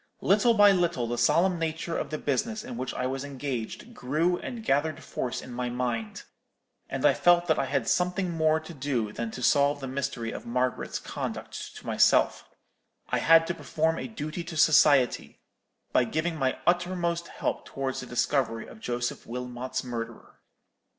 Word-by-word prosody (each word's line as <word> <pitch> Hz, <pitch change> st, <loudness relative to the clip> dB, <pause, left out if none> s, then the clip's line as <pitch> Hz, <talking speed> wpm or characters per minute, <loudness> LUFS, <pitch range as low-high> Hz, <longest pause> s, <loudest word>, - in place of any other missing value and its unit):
Little 215 Hz, +4 st, +4 dB
by 205 Hz, -1 st, +7 dB
little 175 Hz, -9 st, +1 dB
the 120 Hz, +1 st, -2 dB
solemn 170 Hz, +9 st, +3 dB
nature 165 Hz, +1 st, -2 dB
of -, -, -2 dB
the 155 Hz, -, -3 dB
business 215 Hz, -, -1 dB
in 125 Hz, -, -7 dB
which 125 Hz, +1 st, -3 dB
I 125 Hz, -, -2 dB
was 135 Hz, +1 st, -2 dB
engaged 135 Hz, -5 st, -5 dB
grew 155 Hz, +8 st, 0 dB
and 230 Hz, -3 st, -7 dB
gathered 150 Hz, 0 st, 0 dB
force 125 Hz, -1 st, -4 dB
in 130 Hz, -, -10 dB
my 125 Hz, 0 st, -2 dB
mind, 120 Hz, -3 st, -3 dB, 0.7 s
and -, -, -2 dB
I -, -, +6 dB
felt 175 Hz, 0 st, +4 dB
that 160 Hz, -2 st, +2 dB
I 135 Hz, -, +1 dB
had -, -, -1 dB
something 180 Hz, 0 st, +1 dB
more 160 Hz, -1 st, +2 dB
to 160 Hz, +2 st, -10 dB
do 130 Hz, -7 st, -2 dB
than 115 Hz, +1 st, -3 dB
to 125 Hz, +3 st, -7 dB
solve 145 Hz, +2 st, +3 dB
the 135 Hz, -, -5 dB
mystery 130 Hz, -4 st, -3 dB
of -, -, -7 dB
Margaret's 125 Hz, +2 st, -1 dB
conduct -, -, -6 dB
to -, -, -11 dB
myself: -, -, +3 dB, 0.6 s
I -, -, +1 dB
had 165 Hz, 0 st, +6 dB
to 170 Hz, -, -2 dB
perform 160 Hz, +1 st, -1 dB
a -, -, -4 dB
duty 170 Hz, -, -5 dB
to 165 Hz, -2 st, -6 dB
society, 145 Hz, -4 st, +4 dB, 0.5 s
by 125 Hz, -, +4 dB
giving 155 Hz, +7 st, -1 dB
my 135 Hz, -4 st, 0 dB
uttermost 175 Hz, -1 st, 0 dB
help -, -, -3 dB
towards 135 Hz, -1 st, -3 dB
the 125 Hz, -, -7 dB
discovery 120 Hz, -1 st, 0 dB
of -, -, -13 dB
Joseph 120 Hz, -, -3 dB
Wilmot's 125 Hz, +1 st, -4 dB
murderer. 115 Hz, -2 st, -7 dB
145 Hz, 175 wpm, -27 LUFS, 125-170 Hz, 0.7 s, by